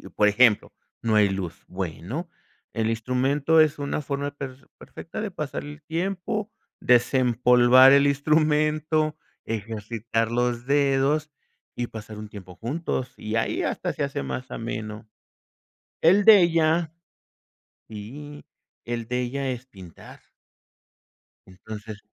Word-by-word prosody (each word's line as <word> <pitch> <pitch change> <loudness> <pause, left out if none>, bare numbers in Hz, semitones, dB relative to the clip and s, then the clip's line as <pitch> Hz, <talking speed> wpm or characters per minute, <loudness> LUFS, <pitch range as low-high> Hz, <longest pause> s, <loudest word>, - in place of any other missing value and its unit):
por 105 - +2
ejemplo, 105 0 +4 0.3
no 115 -1 +1
hay 105 -1 +5
luz, 95 -2 -5
bueno, 95 - -5 0.4
el 110 -1 -1
instrumento 130 +7 +2
es 155 -2 +3
una 145 +1 -2
forma 140 0 -3
per 135 -1 -8
perfecta 165 - -8
de 215 -1 -3
pasar 155 -6 -5
el 145 +1 -10
tiempo, 195 +6 -3 0.3
desempolvar 125 +1 +5
el 140 0 +5
instrumento, 155 +1 +1 0.3
ejercitar 115 +1 -3
los 120 0 0
dedos 140 +2 +2 0.5
y 120 -1 -2
pasar 110 -1 -9
un 105 0 -8
tiempo 95 -3 -11
juntos. 130 - -3
Y 110 +1 -5
ahí 115 - 0
hasta - - -2
se - - -4
hace - - -3
más 100 - -5
ameno. 110 -1 -6 1.0
El 195 +5 +5
de 210 -3 +9
ella 165 -1 +2 1.0
sí, 140 +8 -9 0.4
el 120 -1 -4
de 125 0 -1
ella 135 +2 -3
es 125 0 -6
pintar. 95 -9 -14 1.3
Entonces 105 +3 -9
130 Hz, 120 wpm, -25 LUFS, 110-150 Hz, 1.3 s, de